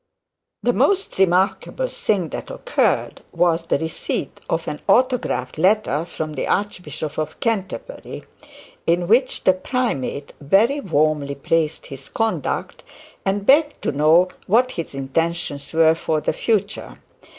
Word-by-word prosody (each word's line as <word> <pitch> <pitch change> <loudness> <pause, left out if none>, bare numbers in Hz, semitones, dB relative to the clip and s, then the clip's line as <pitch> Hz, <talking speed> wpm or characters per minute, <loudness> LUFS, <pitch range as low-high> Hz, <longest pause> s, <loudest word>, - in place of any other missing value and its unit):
The - - +2
most 395 - +1
remarkable 190 - +2
thing 190 - -1
that - - -6
occurred, - - 0
was 170 -1 +1
the - - +2
receipt 160 -2 -4
of 165 0 -1
an 150 - -4
autographed 245 - +1
letter 180 -5 +2
from 155 -2 -5
the 135 - -3
Archbishop 155 -7 -3
of 155 0 -4
Canterbury, 225 - -3 0.6
in 175 +1 +2
which 250 +5 +2
the 185 - +5
primate 185 - -2
very 210 - +3
warmly 150 - 0
praised 155 +2 0
his 135 -1 -10
conduct, 225 -1 -2 0.4
and 200 +1 0
begged 295 +4 +4
to - - +1
know 155 +5 +4 0.2
what 245 +6 +3
his 165 - -6
intentions 145 +1 -2
were 160 0 +5
for 160 -1 -1
the - - -1
future. 215 -2 -1
170 Hz, 130 wpm, -21 LUFS, 155-215 Hz, 0.6 s, the